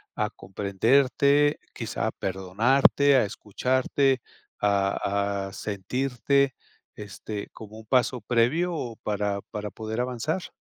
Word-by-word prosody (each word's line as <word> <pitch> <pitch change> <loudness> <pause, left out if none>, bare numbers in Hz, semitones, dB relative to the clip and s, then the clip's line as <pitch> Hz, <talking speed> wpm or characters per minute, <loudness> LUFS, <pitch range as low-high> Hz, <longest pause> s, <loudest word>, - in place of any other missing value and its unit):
a - - 0
comprenderte, 135 +9 +2
quizá - - -3
a - - -1
perdonarte, 115 +9 +3
a 125 - +3
escucharte, 130 +5 0 0.4
a 100 0 0
a - - -14
sentirte, 125 +6 0 0.4
este, 105 0 -7
como 110 0 -11
un 110 - -13
paso 125 +1 +1
previo 125 - +1
o 120 -7 -4
para 100 -1 -1
para 105 0 -4
poder 110 +2 -4
avanzar? 130 +8 -3
115 Hz, 115 wpm, -26 LUFS, 100-135 Hz, 0.4 s, perdonarte